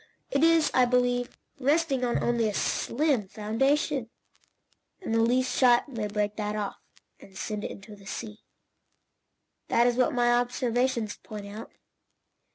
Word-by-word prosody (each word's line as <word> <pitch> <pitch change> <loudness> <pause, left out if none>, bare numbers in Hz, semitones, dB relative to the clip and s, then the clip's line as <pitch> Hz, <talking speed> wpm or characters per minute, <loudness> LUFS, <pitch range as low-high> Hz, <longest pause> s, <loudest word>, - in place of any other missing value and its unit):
It 280 +2 +2
is, 330 -1 +4
I 255 - +5
believe, 245 0 0 0.2
resting 285 -1 +1
on 240 -1 0
only 235 -2 +1
a 205 - -4
slim 265 -5 0
foundation, 250 +5 0 0.9
and 330 - -4
the 225 - +3
least 255 +3 +1
shock 245 0 +4
may 225 -6 -4
break 210 0 -2
that 210 -1 -2
off, 205 -2 -3 0.4
and 190 -1 -15
send 210 -1 -4
it - - -3
into 205 +2 -10
the 200 -1 -16
sea. 215 0 -6 1.3
That 235 - +3
is 245 0 +2
what 255 +4 +3
my 240 -2 +2
observations 245 -1 0
point 210 -2 -9
out." 210 +3 -8
240 Hz, 150 wpm, -27 LUFS, 215-255 Hz, 1.3 s, I